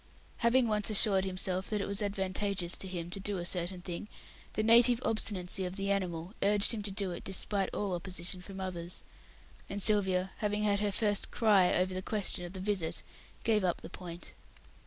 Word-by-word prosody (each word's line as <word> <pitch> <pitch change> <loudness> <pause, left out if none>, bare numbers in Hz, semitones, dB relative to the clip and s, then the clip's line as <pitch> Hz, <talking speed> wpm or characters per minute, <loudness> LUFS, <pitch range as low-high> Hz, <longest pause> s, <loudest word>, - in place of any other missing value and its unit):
Having 235 +1 +4
once 210 -1 +1
assured 200 -2 +4
himself 185 0 -2
that 210 - 0
it 200 - -1
was 200 +1 -3
advantageous 195 -2 -1
to 190 - -5
him 175 -2 -4
to 195 - -4
do 200 0 -1
a 175 - -3
certain 180 +1 -1
thing, 175 +2 -5 0.5
the 215 - 0
native 235 +1 +6
obstinacy 195 -4 0
of 180 0 -4
the 195 0 -1
animal 180 -2 -2
urged 205 0 +5
him 225 -3 -1
to 205 - -2
do 195 -1 -2
it 175 - -6
despite 195 +1 -1
all 200 -3 -2
opposition 180 +1 -2
from 195 +1 -9
others, 175 -2 -3 0.7
and 200 - -3
Sylvia, 190 -3 +2
having 210 -1 -1
had 200 -1 +2
her 205 -1 +1
first 205 0 0
"cry" 205 -6 +4
over 185 +1 +1
the 185 - -3
question 200 -3 0
of 175 - -8
the 190 - -6
visit, 190 -4 -1 0.4
gave 215 -3 +2
up 175 -2 0
the - - -9
point. 175 -2 -6
195 Hz, 195 wpm, -32 LUFS, 180-210 Hz, 0.7 s, native